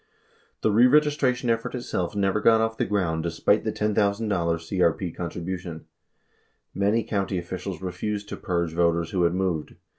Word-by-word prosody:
The 110 - +2
reregistration 125 +1 +3
effort 115 +2 -2
itself 105 -6 -3
never 100 +1 +1
got 115 +1 +5
off 110 0 0
the - - -1
ground 90 -5 0
despite 85 0 +1
the - - -1
$10,000 105 0 -1
CRP 90 -4 0
contribution. 85 -1 -5 0.9
Many 105 +4 +1
county 100 -2 -1
officials 90 +1 -5
refused 100 +3 -3
to - - -5
"purge" 85 -2 -2
voters 85 -1 +1
who 95 - 0
had 85 +1 +1
moved. 90 -5 -2
95 Hz, 145 wpm, -25 LUFS, 85-105 Hz, 0.9 s, got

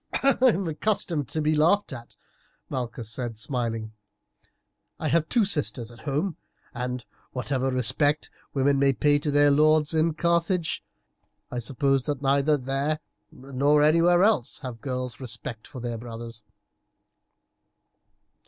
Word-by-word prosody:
"I 275 0 +5
am 210 -8 +3
accustomed 160 - -1
to 155 - -3
be 155 +1 +2
laughed 165 +3 +3
at," 120 -2 -10 0.6
Malchus 120 -3 -4
said 115 0 -5
smiling; 115 -2 -3 1.1
"I - - -1
have 165 -1 +1
two 235 -4 +3
sisters 120 - 0
at 120 - -14
home, 155 +5 -1 0.4
and, 125 0 -4 0.3
whatever 130 +1 -1
respect 145 +4 +1 0.2
women 140 0 +2
may 135 0 +4
pay 145 +5 +3
to 150 - -3
their 145 0 +4
lords 155 +1 +4
in 160 0 +2
Carthage, 170 +1 0 0.7
I 125 - -2
suppose 135 +2 0
that 145 -3 -1
neither 140 +2 +2
there 135 +3 -1 0.3
nor 140 +3 +1
anywhere 170 +3 +5
else 205 - +2
have 120 -3 -6
girls 125 -3 -4
respect 120 -3 -7
for 135 - -9
their 120 -1 -4
brothers." 115 -1 -8
140 Hz, 135 wpm, -26 LUFS, 125-155 Hz, 1.1 s, I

